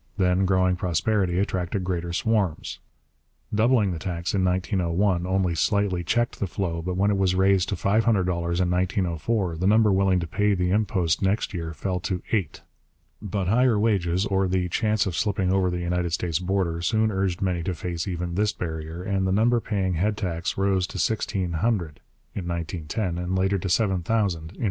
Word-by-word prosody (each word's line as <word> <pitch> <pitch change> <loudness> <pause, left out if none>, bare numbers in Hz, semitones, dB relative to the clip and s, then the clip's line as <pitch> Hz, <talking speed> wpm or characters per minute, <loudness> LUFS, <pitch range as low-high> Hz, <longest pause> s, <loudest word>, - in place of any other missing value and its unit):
Then 95 0 +2
growing 95 -1 +2
prosperity 90 +2 0
attracted 95 -1 -1
greater 90 -1 -2
swarms. 95 -2 -1 0.7
Doubling 110 -2 +3
the 85 - -4
tax 85 0 -3
in 95 -2 +1
1901 90 0 0
only 95 -2 +1
slightly 95 0 +1
checked 120 +8 0
the 100 - -1
flow, 85 -3 -3
but 90 +2 -3
when 100 +2 +3
it 100 - 0
was 95 -1 +2
raised 95 0 +3
to 100 - -1
$500 100 +5 +2
in 110 -4 +2
1904 90 +2 0
the 95 +3 0
number 110 0 +5
willing 95 -1 +3
to 85 - -3
pay 105 +5 +1
the 90 -1 0
impost 95 -5 +1
next 100 +2 0
year 80 -3 -4
fell 90 +4 -3
to 90 0 -3
eight. 95 -10 -1 0.6
But 100 -2 -2
higher 120 +2 +3
wages, 95 -4 +1
or 95 -1 +1
the 90 0 0
chance 110 +3 +1
of 95 -4 -3
slipping 95 -2 0
over 95 -1 +2
the 90 0 -3
United 85 -1 -1
States 85 -2 0
border, 90 -2 -1
soon 110 +4 +1
urged 95 -3 -1
many 90 -3 -1
to 90 +2 -2
face 85 +1 -4
even 90 -1 -3
this 105 +3 +1
barrier, 80 0 -5
and 95 0 0
the - - +1
number 115 +5 +3
paying 95 -5 -1
head 100 +5 0
tax 85 -4 -3
rose 95 -1 +1
to 95 - -8
sixteen 95 -3 -1
hundred 85 -4 -1 0.3
(1910) 85 +1 -3
and 90 +1 -2
later 95 +1 +1
to 95 - -3
seven 95 -1 +2
thousand 90 -5 0
(1913). - - -15
95 Hz, 180 wpm, -25 LUFS, 85-100 Hz, 0.7 s, number